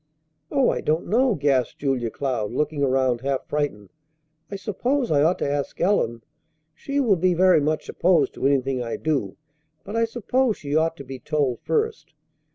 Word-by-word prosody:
"Oh, 275 Hz, -3 st, +3 dB
I -, -, -3 dB
don't 155 Hz, +2 st, 0 dB
know!" 245 Hz, +1 st, +2 dB
gasped 135 Hz, -5 st, +1 dB
Julia 130 Hz, -5 st, -1 dB
Cloud, 120 Hz, -5 st, -2 dB
looking 150 Hz, +3 st, -1 dB
around 130 Hz, -3 st, +1 dB
half 135 Hz, 0 st, -2 dB
frightened. 145 Hz, -10 st, -3 dB, 0.6 s
"I 200 Hz, -, -5 dB
suppose 240 Hz, -, -1 dB
I 145 Hz, -2 st, +4 dB
ought 165 Hz, +5 st, +3 dB
to -, -, -2 dB
ask 140 Hz, -1 st, -3 dB
Ellen. 120 Hz, -, +1 dB, 0.5 s
She 280 Hz, -, -3 dB
will 225 Hz, -9 st, +3 dB
be 180 Hz, +1 st, +2 dB
very 185 Hz, -2 st, +5 dB
much 155 Hz, +2 st, -1 dB
opposed 170 Hz, -6 st, +2 dB
to 135 Hz, -, 0 dB
anything 135 Hz, -2 st, +1 dB
I 115 Hz, -1 st, -3 dB
do, 140 Hz, -11 st, -2 dB, 0.5 s
but 205 Hz, -, -7 dB
I 230 Hz, 0 st, +3 dB
suppose 240 Hz, +1 st, 0 dB
she 145 Hz, 0 st, -4 dB
ought 160 Hz, +1 st, +1 dB
to 140 Hz, -, -8 dB
be 135 Hz, -1 st, -8 dB
told 135 Hz, -4 st, -1 dB
first." 450 Hz, 0 st, -2 dB
150 Hz, 175 wpm, -23 LUFS, 135-200 Hz, 0.6 s, very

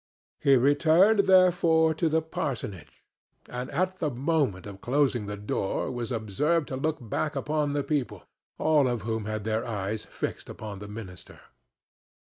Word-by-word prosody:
He 140 Hz, -1 st, +5 dB
returned, 160 Hz, -, +4 dB
therefore, 175 Hz, -4 st, +5 dB
to 160 Hz, +1 st, 0 dB
the 160 Hz, +1 st, +1 dB
parsonage, 115 Hz, -, -5 dB, 0.4 s
and 125 Hz, +1 st, -5 dB
at 185 Hz, +5 st, -1 dB
the 155 Hz, -, 0 dB
moment 135 Hz, -, 0 dB
of 100 Hz, -1 st, -9 dB
closing 130 Hz, -5 st, +1 dB
the 105 Hz, 0 st, -5 dB
door 100 Hz, +3 st, -2 dB
was 120 Hz, -1 st, -4 dB
observed 135 Hz, -, 0 dB
to 130 Hz, -, -3 dB
look 155 Hz, +4 st, -1 dB
back 135 Hz, +5 st, -3 dB
upon 150 Hz, -1 st, -1 dB
the 145 Hz, -1 st, 0 dB
people, 145 Hz, -4 st, -2 dB, 0.3 s
all 150 Hz, -4 st, +3 dB
of 120 Hz, -4 st, -2 dB
whom 110 Hz, -1 st, -2 dB
had 110 Hz, -1 st, -3 dB
their 110 Hz, +1 st, -1 dB
eyes 105 Hz, -2 st, -3 dB
fixed -, -, -5 dB
upon 105 Hz, -3 st, -7 dB
the 105 Hz, -, -8 dB
minister. 105 Hz, -3 st, -10 dB
135 Hz, 155 wpm, -27 LUFS, 110-155 Hz, 0.4 s, He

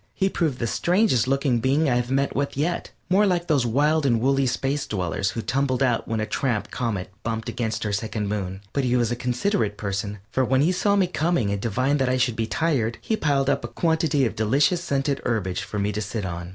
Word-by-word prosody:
He 195 Hz, 0 st, +1 dB
proved 155 Hz, -9 st, -1 dB
the 120 Hz, -, -2 dB
strangest 175 Hz, -, +2 dB
looking 135 Hz, -2 st, +1 dB
being 140 Hz, +6 st, +2 dB
I 125 Hz, -, +2 dB
have 125 Hz, 0 st, -1 dB
met 135 Hz, +1 st, 0 dB
with 140 Hz, 0 st, -2 dB
yet, 165 Hz, +5 st, -1 dB, 0.2 s
more 195 Hz, +4 st, +4 dB
like 175 Hz, -2 st, +1 dB
those 140 Hz, -7 st, +2 dB
wild 150 Hz, +6 st, +2 dB
and 120 Hz, -5 st, +2 dB
woolly 135 Hz, +2 st, +2 dB
space 135 Hz, +3 st, -1 dB
dwellers 95 Hz, -1 st, -1 dB
who 115 Hz, +2 st, -4 dB
tumbled 135 Hz, 0 st, 0 dB
out 120 Hz, -3 st, +1 dB
when 115 Hz, -, -1 dB
that 110 Hz, 0 st, -3 dB
tramp 120 Hz, -6 st, -1 dB
comet 105 Hz, -7 st, -3 dB
bumped 115 Hz, -1 st, -3 dB
against 110 Hz, -2 st, -2 dB
our 105 Hz, -, -1 dB
second 105 Hz, 0 st, -2 dB
moon. 95 Hz, -2 st, -3 dB
But 140 Hz, -, 0 dB
he 125 Hz, -1 st, +1 dB
was 120 Hz, -2 st, +1 dB
a -, -, 0 dB
considerate 125 Hz, -, -1 dB
person, 100 Hz, 0 st, -3 dB
for 130 Hz, -, +1 dB
when 130 Hz, +1 st, +2 dB
he 160 Hz, +5 st, +3 dB
saw 200 Hz, +2 st, +2 dB
me 195 Hz, -2 st, +4 dB
coming 165 Hz, -, 0 dB
and 100 Hz, -1 st, -2 dB
divined 130 Hz, +6 st, +1 dB
that 130 Hz, -1 st, +1 dB
I 130 Hz, -, +2 dB
should 125 Hz, -2 st, +1 dB
be 110 Hz, 0 st, -1 dB
tired, 125 Hz, -9 st, 0 dB
he 220 Hz, -, -1 dB
piled 140 Hz, -7 st, +1 dB
up 140 Hz, -1 st, +1 dB
a -, -, -3 dB
quantity 160 Hz, -4 st, +1 dB
of 110 Hz, -2 st, -2 dB
delicious 140 Hz, -, +2 dB
scented 140 Hz, -3 st, -1 dB
herbage 100 Hz, -7 st, -1 dB
for 105 Hz, -, -6 dB
me 100 Hz, +1 st, 0 dB
to 105 Hz, +1 st, -3 dB
sit 105 Hz, 0 st, -4 dB
on. 85 Hz, -1 st, -5 dB
130 Hz, 230 wpm, -24 LUFS, 110-145 Hz, 0.2 s, more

